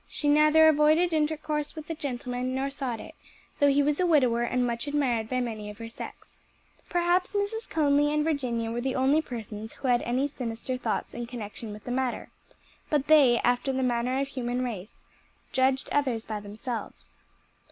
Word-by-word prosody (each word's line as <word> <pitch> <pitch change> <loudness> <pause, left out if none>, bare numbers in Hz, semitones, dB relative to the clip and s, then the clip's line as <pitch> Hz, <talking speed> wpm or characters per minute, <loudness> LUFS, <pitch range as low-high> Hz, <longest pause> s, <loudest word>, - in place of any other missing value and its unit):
She 295 - -3
neither 305 +2 +6
avoided 315 +3 +4
intercourse 300 -1 -1
with 310 -1 -7
the 330 - -4
gentleman 255 -4 -3
nor 270 +1 -1
sought 260 -5 -3
it; - - -10 0.5
though 285 - +5
he 285 0 +4
was 290 0 +1
a 365 - +3
widower 255 -8 +3
and 250 +1 +1
much 235 +3 -3
admired 250 -7 0
by 255 0 0
many 220 -3 -4
of 210 - -9
her 230 0 -7
sex. 230 - -9 0.6
Perhaps 355 +2 +1
Mrs. 410 +3 -2
Conly 295 -1 +3
and 300 0 +1
Virginia 250 -7 -1
were 235 +1 -2
the 265 +1 -1
only 270 +4 +3
persons 220 -5 -7
who 270 - -5
had 240 -1 +4
any 255 +4 0
sinister 250 -2 -4
thoughts 250 - -3
in 240 0 -5
connection 225 -2 -7
with 210 0 -9
the 245 - -5
matter; 255 0 -2 0.6
but 290 -3 +1
they, 285 -6 +6
after 245 +2 +1
the 265 0 -1
manner 250 +1 0
of 275 - +1
the 275 - -15
human 245 -1 -2
race, 215 -4 -6 0.5
judged 265 +1 +2
others 255 -6 0
by 215 -1 -4
themselves. 215 +4 -7
260 Hz, 185 wpm, -27 LUFS, 240-295 Hz, 0.6 s, neither